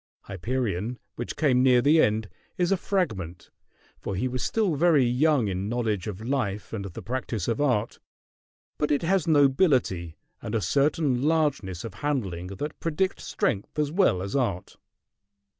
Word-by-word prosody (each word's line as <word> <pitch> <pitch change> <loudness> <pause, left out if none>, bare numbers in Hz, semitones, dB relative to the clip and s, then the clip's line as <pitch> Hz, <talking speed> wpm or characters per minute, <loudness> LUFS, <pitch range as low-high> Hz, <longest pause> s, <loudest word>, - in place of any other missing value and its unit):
"Hyperion," 110 +2 -3 0.2
which 120 - -5
came 135 -5 +3
near 130 -1 +5
the 150 +5 +5
end, 110 0 +1 0.3
is 175 0 +1
a - - +5
fragment, 105 - -3 0.5
for 100 - -4
he 125 +8 0
was 130 -1 -3
still 215 -6 +1
very 155 -2 +4
young 125 0 +2
in 95 +1 -2
knowledge 110 -5 -1
of 105 -1 -5
life 115 -7 -2
and 100 -3 -4
the 95 - -8
practice 125 -2 -3
of 120 +4 0
art; 120 -6 0 0.8
but 150 - +1
it 145 +2 +1
has 185 -1 +1
nobility 135 - +2 0.2
and 110 - -4
a - - +2
certain 140 - +1
largeness 145 - 0
of 115 - -6
handling 100 -11 -2
that 120 +11 -6
predict 165 +4 -1
strength 100 +7 -2
as 150 -1 0
well 160 - +2
as 100 +5 -4
art. 115 -10 -1
125 Hz, 160 wpm, -26 LUFS, 100-150 Hz, 0.8 s, near